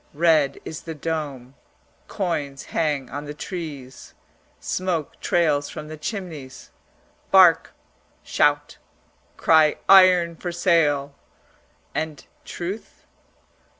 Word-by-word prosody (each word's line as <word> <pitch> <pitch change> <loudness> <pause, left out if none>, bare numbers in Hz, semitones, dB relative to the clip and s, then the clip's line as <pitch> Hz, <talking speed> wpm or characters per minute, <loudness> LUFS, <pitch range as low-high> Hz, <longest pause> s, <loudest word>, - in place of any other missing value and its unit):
Red 155 -3 +3
is 160 - -7
the 165 -1 -7
dome; 145 -5 -5 0.5
coins 150 -8 -3
hang 145 -5 -1
on 145 +2 -5
the 145 0 -7
trees; 150 -7 -8 0.4
smoke 180 -5 -3
trails 150 -4 +1
from 150 0 -8
the 155 - -7
chimneys; 155 - -7 0.6
bark, 185 -4 +5 0.5
shout, - - +1 0.6
cry 155 -2 +4
"Iron 180 -3 +6
for 175 - -5
sale" 150 -6 +1 0.8
and 155 -2 -4 0.2
truth? 185 +5 -7
155 Hz, 95 wpm, -23 LUFS, 145-175 Hz, 0.8 s, Iron